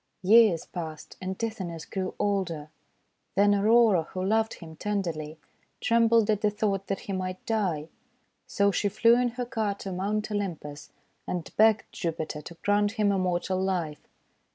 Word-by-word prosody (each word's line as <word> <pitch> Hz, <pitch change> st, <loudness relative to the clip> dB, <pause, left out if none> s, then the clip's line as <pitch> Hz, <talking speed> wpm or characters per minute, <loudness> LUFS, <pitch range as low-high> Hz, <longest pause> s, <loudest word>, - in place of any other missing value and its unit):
Years 210 Hz, -3 st, +5 dB
passed, 160 Hz, -3 st, -7 dB
and 190 Hz, 0 st, -4 dB
Tithonus 185 Hz, -8 st, -4 dB
grew 190 Hz, -1 st, -4 dB
older. 180 Hz, -7 st, -1 dB, 0.7 s
Then 205 Hz, +1 st, +5 dB
Aurora, 215 Hz, -2 st, +5 dB
who 185 Hz, -, -2 dB
loved 220 Hz, +2 st, +1 dB
him 160 Hz, -2 st, -11 dB
tenderly, 165 Hz, -6 st, -3 dB, 0.4 s
trembled 230 Hz, -2 st, +4 dB
at 210 Hz, -1 st, 0 dB
the 210 Hz, -, +3 dB
thought 200 Hz, -2 st, -1 dB
that 195 Hz, -, -2 dB
he 200 Hz, -, -5 dB
might 185 Hz, 0 st, -4 dB
die. 185 Hz, -9 st, -1 dB, 0.6 s
So 200 Hz, 0 st, +2 dB
she 205 Hz, +1 st, 0 dB
flew 230 Hz, +3 st, +4 dB
in 250 Hz, 0 st, +2 dB
her 250 Hz, -, -1 dB
car 220 Hz, -4 st, -1 dB
to 195 Hz, -1 st, -7 dB
Mount 210 Hz, +4 st, -2 dB
Olympus 165 Hz, -8 st, -4 dB, 0.4 s
and 175 Hz, -2 st, -4 dB
begged 220 Hz, 0 st, +5 dB
Jupiter 160 Hz, -3 st, -4 dB
to 170 Hz, -, -10 dB
grant 205 Hz, 0 st, +2 dB
him 210 Hz, -3 st, +2 dB
immortal 185 Hz, -1 st, 0 dB
life. 175 Hz, -6 st, -2 dB
195 Hz, 155 wpm, -27 LUFS, 175-215 Hz, 0.7 s, Years